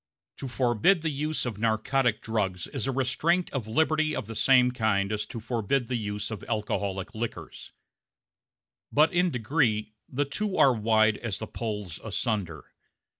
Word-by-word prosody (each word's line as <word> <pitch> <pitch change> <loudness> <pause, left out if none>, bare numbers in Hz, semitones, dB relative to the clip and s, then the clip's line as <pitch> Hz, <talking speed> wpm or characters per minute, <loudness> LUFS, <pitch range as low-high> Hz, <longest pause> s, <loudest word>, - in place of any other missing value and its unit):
To 135 - -5
forbid 130 - +2
the 160 - 0
use 150 +1 -1
of 110 -4 -4
narcotic 115 +2 +1
drugs 95 -6 -1
is - - -4
a - - +1
restraint 135 +8 +1
of 125 -6 -3
liberty 155 +5 +1
of - - -3
the 115 - -7
same 125 +1 +5
kind 110 -4 +1
as 105 -1 -2
to 115 - -6
forbid 120 +2 -1
the 125 - 0
use 105 -1 -3
of 110 - -6
alcoholic 100 -2 -2
liquors; 115 0 -6 1.2
but 155 +4 +4
in 180 +1 +3
degree 115 -5 0 0.2
the 145 +3 0
two 200 +8 -2
are 135 - +6
wide 110 -1 +3
as 110 -5 -4
the 110 - -5
poles 105 -7 -5
asunder. 100 - -2
115 Hz, 160 wpm, -27 LUFS, 105-135 Hz, 1.2 s, are